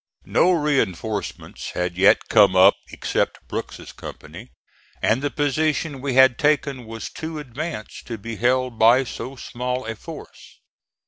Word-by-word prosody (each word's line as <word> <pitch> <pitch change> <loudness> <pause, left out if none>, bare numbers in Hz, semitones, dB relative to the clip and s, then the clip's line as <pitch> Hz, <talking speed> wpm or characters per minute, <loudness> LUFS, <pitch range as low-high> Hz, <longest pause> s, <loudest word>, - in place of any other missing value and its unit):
No 180 - +3
reinforcements 115 - -2
had 90 0 -2
yet 95 +2 +4
come 100 -4 +5
up 95 +2 +7 0.2
except - - -2
Brooks's - - -6
company, - - -10 0.5
and 115 +4 +1
the 145 - 0
position 145 -1 -1
we 135 -2 -2
had 130 -1 +6
taken 140 -4 +1
was 115 -2 -7
too 160 0 -6
advanced 145 -3 -6
to 115 -3 -5
be 110 +2 -7
held 125 0 +1
by 120 +4 +6
so 130 +2 -7
small 125 0 -4
a 115 0 -4
force. - - -11
125 Hz, 140 wpm, -22 LUFS, 110-145 Hz, 0.5 s, up